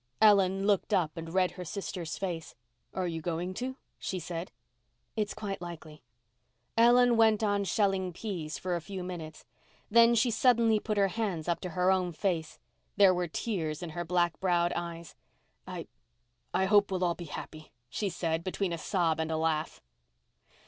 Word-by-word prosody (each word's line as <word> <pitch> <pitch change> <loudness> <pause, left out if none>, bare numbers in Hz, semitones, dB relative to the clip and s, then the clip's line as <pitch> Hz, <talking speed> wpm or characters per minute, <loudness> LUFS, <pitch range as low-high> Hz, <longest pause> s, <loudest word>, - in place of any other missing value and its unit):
Ellen 195 -2 +5
looked 205 +1 +2
up 165 -5 0
and 165 0 -6
read 185 0 +2
her 180 0 -7
sister's 180 -2 -5
face. 170 -8 -4 0.4
"And 180 -3 -2
you're 165 - -4
going 175 +3 -2
to?" 255 +6 -4 0.2
she 190 - -3
said. 170 0 -5 0.6
"It's 215 -2 -1
quite 205 -3 -4
likely." 160 -3 -9 0.7
Ellen 240 +1 +6
went 220 -1 +4
on 205 -1 +1
shelling 190 -1 +1
peas 170 -5 -5
for 180 -1 -2
a 170 - -2
few 190 +1 -6
minutes. 165 -4 -7 0.5
Then 235 +1 +7
she 235 +1 +3
suddenly 230 -2 +4
put 215 0 -2
her 200 -1 +4
hands 190 -7 -2
up 170 - 0
to 180 - -4
her 180 +1 +4
own 180 -2 +1
face. 160 -5 -2 0.4
There 195 -2 +7
were 180 -1 -1
tears 160 -4 -3
in 170 - -5
her 175 +2 -3
black 175 0 +1
browed 175 -2 +2
eyes. 170 -1 -5 0.5
"I—I - - -6
hope 205 +1 +4
we'll 185 -1 -1
all 175 -1 +2
be 175 - -8
happy," 155 0 -8 0.2
she 200 - -2
said 165 -2 -2
between 185 0 -2
a 165 - -4
sob 165 -2 +1
and 160 0 -1
a 160 - 0
laugh. 160 -1 -1
180 Hz, 170 wpm, -30 LUFS, 165-200 Hz, 0.7 s, Then